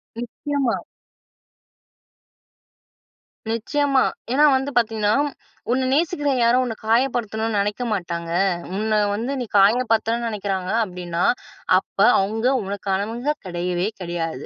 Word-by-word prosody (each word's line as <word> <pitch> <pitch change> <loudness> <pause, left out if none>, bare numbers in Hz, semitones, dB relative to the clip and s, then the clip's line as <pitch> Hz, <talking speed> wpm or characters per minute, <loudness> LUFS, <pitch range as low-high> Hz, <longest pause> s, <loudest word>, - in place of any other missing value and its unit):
நிச்சயமா, 250 +2 -2 2.7
நிச்சயமா. 275 +4 +1 0.3
ஏன்னா 295 +3 +5
வந்து, 270 +2 -1
பாத்தீங்கன்னா, 220 -2 +2 0.6
"உன்ன 260 +1 +1
நேசிக்கிற 300 -2 +1
யாரும், 245 +2 +4
உன்னை 225 -2 -4
காயப்படுத்தனும்ன்னு 225 -2 +1
நெனைக்க 210 +4 -1
மாட்டாங்க. 170 -3 -4 0.5
உன்ன 215 0 +1 0.2
வந்து 235 +6 -3
நீ - - -2
காயப்படுத்தனும்ன்னு 230 +2 +3
நெனைக்கிறாங்க 195 -3 -3
அப்டின்னா, 180 -3 -3 0.5
அப்ப - - -21 0.2
அவுங்க 220 +5 0 0.2
உனக்கானவங்க 205 +8 -2
கெடையவே 175 +1 -2
கெடையாது" 165 -5 -4
220 Hz, 95 wpm, -22 LUFS, 195-250 Hz, 2.7 s, ஏன்னா